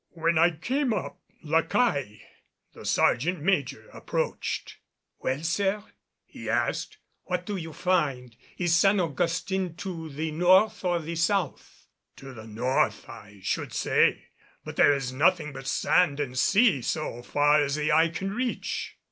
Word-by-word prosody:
When 165 0 +1
I 170 +2 +6
came 245 - -1
up - - -5 0.2
La 160 +1 +2
Caille, 145 - 0 0.6
the - - -12
sergeant 170 +8 +2
major, 140 - -1
approached. - - -3 0.4
"Well, 130 +4 -2
sir," 195 +4 0 0.4
he - - -9
asked, - - -1 0.3
"what 180 0 -2
do 205 - -3
you 165 -3 -6
find? 145 -10 -1 0.2
Is 175 -2 +2
San 195 +3 +4
Augustin 175 +3 -1
to 165 -4 -6
the 155 +2 -4
north 185 +7 +3
or 175 -1 +1
the 165 0 -5
south?" 175 -2 -2 0.3
"To 135 -1 -11
the 110 -2 -11
north, 120 +5 0
I 100 -1 -13
should - - -2
say. - - +1 0.4
But - - -7
there 145 - +5
is 135 -2 -4
nothing 155 +1 +2
but 135 0 -8
sand 175 -6 +2
and 130 -3 -3
sea 195 - +3
so 120 -2 -3
far 145 +4 +3
as 140 0 -1
the 150 +1 0
eye 160 +2 +4
can 190 +4 -4
reach." 245 +2 -3
160 Hz, 150 wpm, -27 LUFS, 140-185 Hz, 0.6 s, I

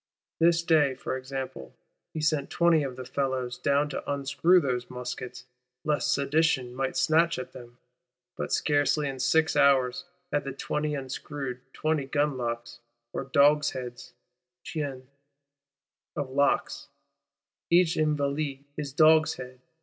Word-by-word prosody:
This 170 0 +4
day, 150 -5 +3
for 130 - -4
example, 130 - -6 0.4
he 155 - -4
sent 150 -2 0
twenty 170 -2 +3
of 135 -3 -4
the 130 - -7
fellows 130 -2 -2
down 140 0 +2
to 145 - -4
unscrew 140 +6 +3
those 125 -5 -2
muskets; 125 0 -6 0.4
lest 150 -1 +1
Sedition 140 -3 +1
might 130 +1 -2
snatch 165 +1 +3
at 130 0 -6
them; 120 -1 -12 0.6
but - - -4
scarcely, 145 0 +2
in 135 -1 -5
six 155 +5 +2
hours, 140 +2 +3 0.3
had 145 - +1
the 135 - -5
twenty 150 +2 -2
unscrewed 135 -1 -5
twenty 155 -2 -1
gun 145 +1 0
locks, 120 -1 -4 0.3
or - - -3
dogsheads 140 -3 +1 0.5
(chiens) 140 -4 -4 1.1
of 145 -3 -3
locks,—each 165 +4 -1
Invalide 145 -2 -1
his 145 -2 -4
dogshead! 155 -5 +3
140 Hz, 125 wpm, -27 LUFS, 130-150 Hz, 1.1 s, This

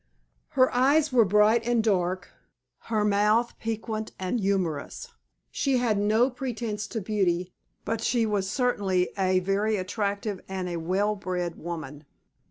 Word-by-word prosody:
Her 255 0 +5
eyes 280 +4 +3
were 235 -3 +6
bright 210 +4 +4
and 235 -1 +1
dark, 185 -3 0 0.5
her 215 -2 0
mouth 210 +3 +2
piquant 220 -1 -4
and 190 +6 -2
humorous. 190 -7 -2 0.4
She 275 -2 +1
had 230 -4 +1
no 220 +5 +3
pretence 235 -4 -4
to 225 - -4
beauty, 185 -3 0 0.3
but 225 0 -2
she 235 0 +1
was 200 -3 -1
certainly 200 -6 +1
a 185 -2 +2
very 200 +3 +1
attractive 200 +1 -2
and 190 -1 -3
a - - -4
very 165 -1 -5
well 205 +3 +1
bred 180 -3 -3
woman. 155 -3 -7
210 Hz, 145 wpm, -27 LUFS, 185-225 Hz, 0.5 s, were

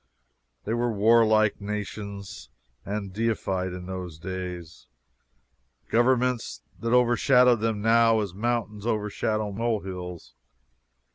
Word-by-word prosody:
They 110 - -1
were 120 0 0
warlike 110 0 +4
little 100 - -8
nations 100 - -7 0.3
and 100 -1 -4
defied, 95 -4 -1
in 90 0 -7
those 90 -3 -6
days, 90 -1 -7 1.0
governments 120 - +1 0.2
that 115 0 -2
overshadow 125 +1 +5
them 110 -2 -2
now 115 0 +4
as 100 -4 -4
mountains 110 0 -2
overshadow 110 -1 -1
molehills. 95 -6 -4
105 Hz, 100 wpm, -26 LUFS, 95-115 Hz, 1.0 s, overshadow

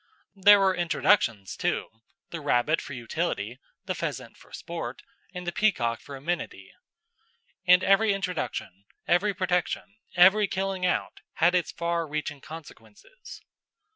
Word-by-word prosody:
There 205 +1 +7
were 190 -1 +3
introductions 165 - +1
too 110 - -3 0.3
the 165 - -5
rabbit 145 +3 +2
for 145 - -8
utility, 120 -2 -3 0.3
the - - -2
pheasant - - -5
for - - -20
sport, - - -6 0.3
and 180 0 -7
the 175 - -1
peacock 120 - +1
for 140 - -9
amenity. 165 +6 -5 0.9
And 180 +1 +7
every 205 +3 +4
introduction, 180 - -4 0.2
every 200 +3 +2
protection, 185 +3 -1 0.2
every 195 +4 +6
killing 190 -1 -1
out - - -2
had 175 +3 +3
its 180 -2 +1
far 170 -1 -2
reaching 150 0 -4
influences. 155 - -13
175 Hz, 130 wpm, -27 LUFS, 140-190 Hz, 0.9 s, There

